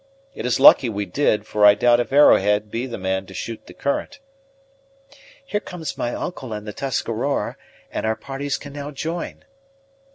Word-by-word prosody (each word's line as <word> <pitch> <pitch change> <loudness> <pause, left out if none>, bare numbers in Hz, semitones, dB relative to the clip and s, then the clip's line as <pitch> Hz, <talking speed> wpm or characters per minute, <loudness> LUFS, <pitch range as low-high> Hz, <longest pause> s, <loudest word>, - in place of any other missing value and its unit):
It - - -4
is 125 - +1
lucky 135 -2 +7
we 105 -1 -3
did, 105 0 0
for 105 -1 -1
I 105 0 +8
doubt 120 +3 +4
if 120 - -2
Arrowhead 105 -7 +4
be 120 +3 -3
the 120 - -6
man 95 0 -2
to 95 - -12
shoot 115 +4 -6
the - - -12
current." 275 - -3 1.3
"Here 210 -6 -1
come 180 -4 -9
my 120 - -2
uncle 130 -10 -5
and 105 0 -6
the 105 - -6
Tuscarora, 130 +1 -2 0.4
and - - -3
our 110 0 0
parties 140 +2 -4
can 145 -1 -10
now 145 0 -6
join." 160 +4 -5
120 Hz, 175 wpm, -22 LUFS, 105-140 Hz, 1.3 s, I